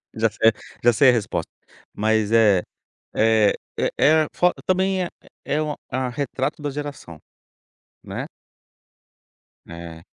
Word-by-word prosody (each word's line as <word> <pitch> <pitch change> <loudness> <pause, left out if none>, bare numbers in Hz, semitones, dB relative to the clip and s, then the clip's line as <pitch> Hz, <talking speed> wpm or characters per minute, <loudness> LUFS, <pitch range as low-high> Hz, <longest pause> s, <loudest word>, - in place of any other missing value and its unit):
Já 115 0 +2
sei, 110 +1 +3 0.3
já 120 0 +5
sei 135 +3 +6
a - - +6
resposta, 110 -5 -2 0.4
mas, 110 0 +1
eh 105 -5 +5 0.5
eh 110 -2 +4 0.5
eh. 155 +2 +5
a - - -8
fo 180 0 +3
também 190 0 +1
é - - -4 0.4
é 150 - 0
uma 150 -1 -2
a 130 0 -1
retrato 140 +3 -3
da 145 - -2
geração, 140 - -7 0.9
né? - - -5 1.4
É. 85 -1 -9
120 Hz, 130 wpm, -22 LUFS, 110-145 Hz, 1.4 s, sei